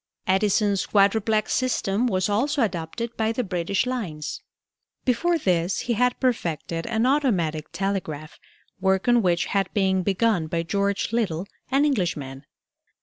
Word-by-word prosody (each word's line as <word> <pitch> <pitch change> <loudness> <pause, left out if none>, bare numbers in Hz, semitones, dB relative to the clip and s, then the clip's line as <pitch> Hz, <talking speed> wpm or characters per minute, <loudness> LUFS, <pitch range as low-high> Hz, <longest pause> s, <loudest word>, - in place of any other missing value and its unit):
Edison's 200 0 +2
quadruplex 215 +1 +2
system 245 -3 +1
was 185 -4 +1
also 265 +7 +1
adopted 200 +5 -3
by 220 0 +1
the 245 +2 -1
British 185 +1 -1
lines. 195 -13 -4 0.6
Before 335 +8 +2
this 180 - 0
he 240 - -1
had 250 +2 +1
perfected 170 - -1
an 230 0 +1
automatic 185 - +1
telegraph, 170 -6 -3 0.4
work 190 +1 +1
on 240 -1 +5
which 175 -3 +1
had 195 -2 +1
been 190 -2 +2
begun 195 -2 +1
by 165 +1 -1
George 200 +4 -1
Little, 190 -7 0 0.2
an 275 +2 +3
Englishman. 150 - -2
200 Hz, 135 wpm, -24 LUFS, 175-235 Hz, 0.6 s, on